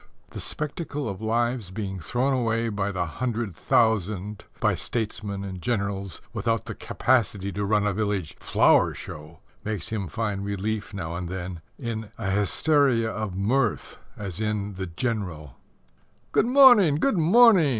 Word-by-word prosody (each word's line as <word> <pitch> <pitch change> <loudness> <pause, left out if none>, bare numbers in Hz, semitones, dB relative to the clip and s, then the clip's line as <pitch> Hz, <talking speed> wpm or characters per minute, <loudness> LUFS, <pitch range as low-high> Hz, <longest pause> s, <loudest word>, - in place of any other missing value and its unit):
The - - -7
spectacle 150 -2 -3
of 100 -1 -5
lives 120 -1 0
being 95 -1 -4
thrown 125 +10 0
away 115 -2 0
by 100 -1 -1
the 90 -2 -1
hundred 110 +2 -3
thousand 105 -2 +1
by - - +2
statesmen 105 -3 -3
and 95 -2 -6
generals 100 -5 -2
without - - -1
the - - -5
capacity 105 -6 0
to 100 +2 -3
run 105 0 +2
a 105 - +1
village 100 -5 -2
flower - - +3
show, 75 +3 -9 0.2
makes 105 -5 -3
him 105 -4 -3
find 100 +3 -2
relief 100 +1 -3
now 85 -5 -5
and 85 0 -4
then 90 -2 -5 0.2
in 110 -4 -4
a 95 -4 -2
hysteria 115 +3 +2
of 105 -4 -4
mirth, 120 +8 0 0.2
as 100 -1 -5
in 105 -2 -1
The 95 0 -5
General: 85 - -3 0.8
"Good - - +3
morning; 245 - +7
good 200 - +1
morning!" 190 0 +6
105 Hz, 150 wpm, -25 LUFS, 95-120 Hz, 0.8 s, morning